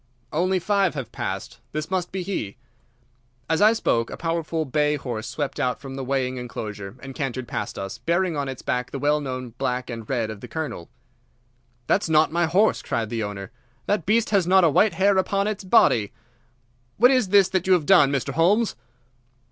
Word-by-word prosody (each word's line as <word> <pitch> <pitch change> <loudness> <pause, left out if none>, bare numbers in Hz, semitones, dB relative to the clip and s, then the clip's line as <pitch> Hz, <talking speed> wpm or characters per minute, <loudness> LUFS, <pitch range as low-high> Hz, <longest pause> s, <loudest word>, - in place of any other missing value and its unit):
"Only 185 +4 +1
five 195 -1 +1
have 125 -5 -5
passed. 95 +4 -5
This 155 +3 -4
must 180 -2 -1
be 190 -1 -3
he." 145 - -4 0.9
As 160 +3 +1
I 215 +2 +7
spoke 115 - 0
a - - -7
powerful 165 -1 -2
bay 150 +2 +1
horse 120 -6 -5
swept 145 +2 -4
out 125 -1 0
from 135 -1 -8
the 135 0 -5
weighing 130 -1 -1
enclosure 105 -5 -6
and 135 -1 -7
cantered 130 -3 -4
past - - -4
us, 95 +5 -6
bearing 170 +5 0
on 140 -2 -2
its 130 - -7
back 125 0 -1
the - - -5
well 150 +2 +1
known 130 -3 -5
black 125 0 -2
and 115 -2 -7
red 115 -5 -1
of 105 -2 -9
the - - -8
Colonel. 155 - -5 1.0
"That's 195 +3 +1
not 155 0 +4
my 170 +1 +1
horse," 195 +7 +3
cried 110 -2 -3
the 115 -1 -2
owner. 100 0 -5 0.3
"That 190 -6 -1
beast 220 +1 +2
has 195 -5 +2
not 190 0 +5
a 165 - +5
white 205 +6 +4
hair 195 +1 +3
upon 195 +1 0
its 210 -1 -3
body. 115 - +4 0.9
What 245 +4 +6
is 255 -6 +3
this 195 -1 +5
that 185 -1 -1
you 190 - +5
have 170 -5 +2
done, 160 -7 +6
Mr. 140 0 -2
Holmes?" 200 +9 +2
150 Hz, 195 wpm, -24 LUFS, 125-185 Hz, 1.0 s, I